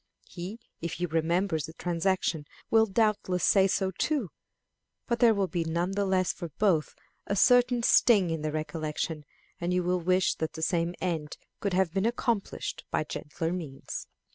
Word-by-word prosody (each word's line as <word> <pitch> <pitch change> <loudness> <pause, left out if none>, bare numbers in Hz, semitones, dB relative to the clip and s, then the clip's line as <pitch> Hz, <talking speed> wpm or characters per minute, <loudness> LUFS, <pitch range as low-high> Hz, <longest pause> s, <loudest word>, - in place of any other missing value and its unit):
He, 185 +5 -7 0.2
if 170 - -3
he 175 - -2
remembers 165 +1 0
the 160 - -10
transaction, 175 -3 -1 0.2
will 225 0 +5
doubtless 205 -3 +1
say 195 -1 +5
so 190 0 0
too; 255 - -1 0.7
but 235 -1 -1
there 230 -2 +6
will 200 -1 +1
be 175 -2 -2
none 170 +3 -1
the 200 +1 0
less 185 -1 +1
for 170 - -7
both 180 -8 +2 0.3
a 200 - 0
certain 245 +2 +4
sting 200 -8 +5
in 160 -1 -2
the 155 0 -2
recollection, 155 0 -3 0.3
and 175 +1 -1
you 180 - +1
will 180 +1 +1
wish 185 +2 +2
that 160 - -3
the 160 - -5
same 170 +1 0
end 160 -5 -3 0.2
could 200 -2 -1
have 180 -3 +2
been 195 +3 +1
accomplished 235 -3 -2
by - - 0
gentler 160 +2 -4
means. 155 -7 -6
180 Hz, 170 wpm, -28 LUFS, 165-200 Hz, 0.7 s, there